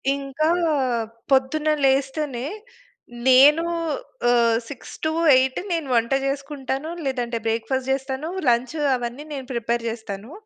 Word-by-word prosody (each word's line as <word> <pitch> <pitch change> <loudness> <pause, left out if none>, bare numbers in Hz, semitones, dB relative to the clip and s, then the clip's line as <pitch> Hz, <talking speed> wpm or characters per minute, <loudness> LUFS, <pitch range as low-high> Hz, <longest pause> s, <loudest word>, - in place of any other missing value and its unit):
ఇంకా, 280 +3 -1 0.8
పొద్దున్న 270 +4 +2 0.2
లేస్తేనే, 270 -1 0 0.8
నేనూ 285 +6 +7 0.6
ఆహ్, 235 -2 +4
6-8 285 -1 +1
నేను 330 -4 -1
వంట 235 +1 +1
జేసుకుంటాను, 275 +1 -3 0.2
లేదంటే 245 -3 -2
బ్రేక్‌ఫాస్ట్ 250 +4 -1
జేస్తాను, 270 +2 -2 0.2
లంచ్ 245 +5 +2 0.2
అవన్నీ 245 +3 -5
నేను 270 -2 -5
ప్రిపేర్ 235 0 -1
జేస్తాను. 220 0 -6
265 Hz, 100 wpm, -23 LUFS, 240-285 Hz, 0.8 s, నేనూ